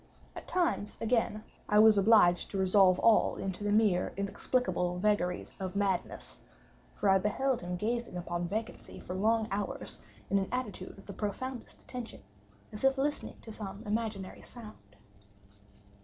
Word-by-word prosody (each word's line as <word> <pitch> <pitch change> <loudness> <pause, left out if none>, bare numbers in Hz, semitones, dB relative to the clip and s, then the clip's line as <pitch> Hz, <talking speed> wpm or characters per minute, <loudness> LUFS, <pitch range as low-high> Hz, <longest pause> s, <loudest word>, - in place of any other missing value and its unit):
At - - -9
times, 340 - 0
again, 225 -2 0 0.3
I 210 - +4
was 215 0 +8
obliged 195 -4 +5
to 200 - -4
resolve 190 -1 +5
all 225 -2 +4
into 195 +1 -4
the 205 - 0
mere 205 -4 +2
inexplicable 200 -2 -1
vagaries 180 -2 0
of 190 0 -4
madness, 195 -3 -2 0.5
for - - -1
I 190 0 +5
beheld 245 +6 0
him 180 0 -4
gazing 230 +1 -2
upon 175 0 -3
vacancy 220 +5 -5
for 180 - -7
long 220 +3 +2
hours, 200 +1 -4 0.3
in 200 - +4
an 190 - -3
attitude 215 -8 -4
of 195 - -14
the 200 - -8
profoundest 240 +6 -5
attention, 240 - -8 0.5
as 210 - -8
if 270 0 +4
listening 290 +2 -2
to 225 - -10
some 200 -1 -7
imaginary 210 -3 -3
sound. 210 - -13
205 Hz, 150 wpm, -31 LUFS, 190-225 Hz, 0.5 s, was